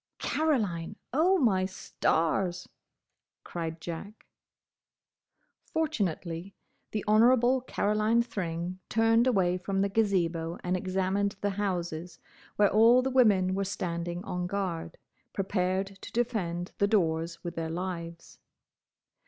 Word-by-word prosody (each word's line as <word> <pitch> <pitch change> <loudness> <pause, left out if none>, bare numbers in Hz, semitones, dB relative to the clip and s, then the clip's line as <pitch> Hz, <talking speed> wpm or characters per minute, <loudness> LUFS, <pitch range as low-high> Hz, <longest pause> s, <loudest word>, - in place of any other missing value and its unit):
"Caroline! 215 - 0 0.2
Oh, 350 +7 +4
my 200 - +3
stars!" 180 -1 0 0.8
cried 165 -1 -5
Jack. 175 +6 -7 1.4
Fortunately 195 - -2 0.3
the 215 - -3
Honourable 240 +4 +5
Caroline 215 -1 +1
Thring 180 -5 -4
turned 225 +2 +3
away 185 -6 +2
from 195 +1 -1
the 200 - +1
Gazebo 175 -6 0
and 180 +1 0
examined 190 +2 0
the 205 - 0
houses, 180 -4 -3 0.4
where 205 -1 +4
all 230 +4 +6
the 265 - -1
women 205 -8 +4
were 195 +1 0
standing 175 -1 -3
on 180 -2 -3
guard, 175 -4 -3 0.4
prepared 195 0 -1
to - - -9
defend 185 -7 -1
the 200 - +4
doors 165 -5 0
with 170 -1 -4
their 165 -1 -3
lives. 170 -1 -6
190 Hz, 110 wpm, -29 LUFS, 175-215 Hz, 1.4 s, all